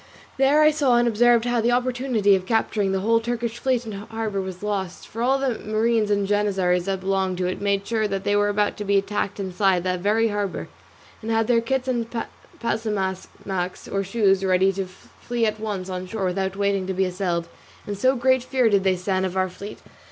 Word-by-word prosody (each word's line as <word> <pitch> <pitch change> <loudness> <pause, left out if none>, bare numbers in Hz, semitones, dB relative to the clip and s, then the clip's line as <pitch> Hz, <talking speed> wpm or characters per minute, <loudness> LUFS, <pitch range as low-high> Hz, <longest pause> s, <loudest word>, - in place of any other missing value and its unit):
There 280 +3 +4
I 305 - +6
saw 280 -5 +2
and 240 0 +3
observed 235 +1 +4
how 240 -1 +1
the 235 +2 +2
opportunity 245 -5 +2
of 185 -1 -3
capturing 215 -3 +1
the 190 0 0
whole 230 +3 +3
Turkish 235 0 -3
fleet 255 -2 0
in 220 - -6
harbour 215 0 -4
was 185 0 -7
lost; 195 -4 -3
for 225 - -6
all 265 +3 +3
the 265 -4 -1
marines 220 0 +1
and 200 -1 +1
janizzaries 190 -4 +1
that 195 -1 -2
belonged 190 -1 0
to 180 - -1
it 180 +2 -3
made 200 -1 0
sure 220 -1 0
that 195 -1 -3
they 205 0 +1
were 205 0 +3
about 205 0 0
to 210 - -4
be 200 0 +2
attacked 200 0 -2
inside 190 -1 +1
the 180 -1 -1
very 220 +4 +2
harbour, 200 - -3 0.5
and 220 - -6
had 225 0 +2
their 230 0 +3
kits 265 +2 -1
and 240 -3 -1 0.5
pasamaques, 190 -4 -3
or 195 0 -1
shoes, 195 -1 +2
ready 190 +1 +3
to 190 0 -3
flee 230 +5 -4
at 215 0 -1
once 205 -4 -4
on 185 -1 -5
shore 200 0 -3
without 190 +1 -1
waiting 200 -1 0
to 190 - -2
be 190 +1 +2
assailed, 180 -2 -2 0.4
in 205 - -4
so 255 +7 +2
great 260 +1 +3
fear 255 -1 +1
did 200 -2 +3
they 190 -1 +3
stand 185 +1 -1
of 190 0 -2
our 185 0 +1
fleet. 200 +3 -9
205 Hz, 210 wpm, -23 LUFS, 190-230 Hz, 0.5 s, I